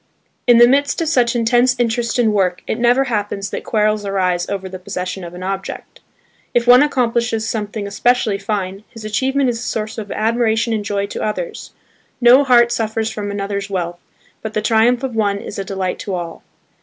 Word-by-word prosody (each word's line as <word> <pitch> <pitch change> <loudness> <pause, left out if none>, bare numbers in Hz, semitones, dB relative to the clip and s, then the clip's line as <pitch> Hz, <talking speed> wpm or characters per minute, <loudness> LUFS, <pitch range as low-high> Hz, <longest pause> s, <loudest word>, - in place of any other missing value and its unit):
In 240 -1 +7
the 240 0 +8
midst 280 +2 +2
of 330 -2 0
such 245 -5 +2
intense 240 +2 +3
interest 235 0 0
in 225 -3 +2
work 185 -3 0
it 220 - -3
never 245 +3 +4
happens 205 -5 -3
that - - -4
quarrels 215 -1 +1
arise 185 -3 -1
over 195 -1 -3
the 185 0 -8
possession 185 0 -5
of 170 0 -8
an 180 - -8
object. 195 +1 -5 0.6
If 240 -1 +3
one 250 +1 +7
accomplishes 235 -5 0
something 210 -1 -3
especially 210 0 +1
fine, 195 -1 -3
his 225 -2 -11
achievement 265 +4 +1
is 230 - -5
a - - -7
source 220 -2 -3
of 205 -2 -7
admiration 225 +1 +1
and 215 -2 -1
joy 200 -1 -1
to 200 - -6
others: 435 - -4 0.5
no 250 +3 +7
heart 240 -3 +5
suffers 225 0 -1
from 205 -2 -5
another's 200 0 -3
wealth, 175 -2 -3 0.4
but 220 0 -6
the 215 - +1
triumph 235 +3 +3
of 255 -3 -3
one 205 -2 +1
is 200 - -7
a - - -2
delight 190 -1 -3
to 195 - -4
all. 170 -2 -6
220 Hz, 195 wpm, -18 LUFS, 200-240 Hz, 0.6 s, the